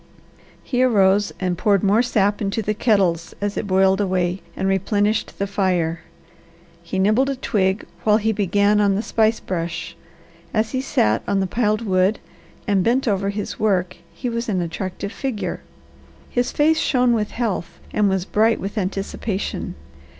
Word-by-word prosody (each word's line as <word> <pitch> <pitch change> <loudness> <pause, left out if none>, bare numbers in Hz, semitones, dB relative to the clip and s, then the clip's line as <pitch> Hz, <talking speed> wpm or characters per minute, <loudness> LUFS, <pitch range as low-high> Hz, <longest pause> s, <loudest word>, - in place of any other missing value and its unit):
He 250 -1 -1
arose 205 -5 +3
and 180 -2 -1
poured 200 -3 +2
more 205 +3 +4
sap 205 -4 +1
into 205 +2 -1
the 210 - 0
kettles 190 -7 +1
as 205 0 -2
it - - -3
boiled 190 +1 +3
away 185 -1 0 0.2
and 190 - -1
replenished 205 +2 0
the 200 - -1
fire. 180 -5 0 0.8
He 170 +3 -5
nibbled 215 +8 +3
a 275 - -1
twig 195 -5 0 0.2
when 210 -1 +4
he 220 0 +1
began 205 0 +2
on 200 -1 +3
the 210 - -1
spice 220 -1 +2
brush. 170 -1 -4 0.6
As 220 +1 +1
he 260 - -1
sat 110 - +1
on 200 - +1
the 190 - +1
piled 215 +2 0
wood, 190 +1 +2 0.5
and 200 -3 +2
bent 250 +5 +1
over 200 -2 +1
his 200 0 -4
work 185 -4 +1
he 255 - -5
was 235 0 -2
an 190 -3 0
attractive 185 +3 -4
figure. 255 -5 -4 0.7
His 245 0 0
face 315 +2 +3
shone 250 -3 +2
with 215 -2 0
health 185 -7 -3
and 210 -1 +3
was 190 -1 0
bright 220 +3 +2
with 200 +3 -3
anticipation. 195 +1 -3
200 Hz, 165 wpm, -21 LUFS, 190-220 Hz, 0.8 s, more